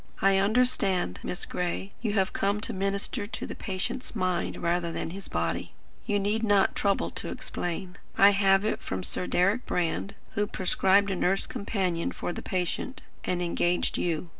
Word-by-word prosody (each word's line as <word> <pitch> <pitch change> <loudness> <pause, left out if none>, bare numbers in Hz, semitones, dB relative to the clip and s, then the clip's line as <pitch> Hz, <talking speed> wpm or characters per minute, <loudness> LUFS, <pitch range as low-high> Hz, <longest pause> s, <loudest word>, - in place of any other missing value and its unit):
"I 195 0 +4
understand, 200 - +2
Miss 180 - -3
Gray, 180 +2 -3
you 220 -3 0
have 195 -2 +1
come 200 +1 +1
to - - -1
minister 200 +3 -1
to - - -5
the - - -5
patient's 195 +6 -4
mind 185 -4 0
rather 170 0 0
than - - -3
to - - -7
his 195 +1 -7
body. 85 0 -2 0.3
You 205 - +2
need 205 +3 0
not 205 -3 +4
trouble 200 -1 +1
to - - -5
explain. 180 +1 -4 0.2
I 200 +1 +8
have 195 0 +4
it 215 - 0
from 95 -1 -4
Sir 180 - -1
Deryck 195 +7 +2
Brand, 180 +3 -1 0.2
who 205 0 0
prescribed 195 +1 +3
a - - 0
nurse 190 +2 +2
companion 185 -5 -1
for 175 - -4
the - - -6
patient, 185 +8 -2 0.2
and 180 -1 0
engaged 175 0 +1
you. 170 0 -1
195 Hz, 175 wpm, -28 LUFS, 180-200 Hz, 0.3 s, I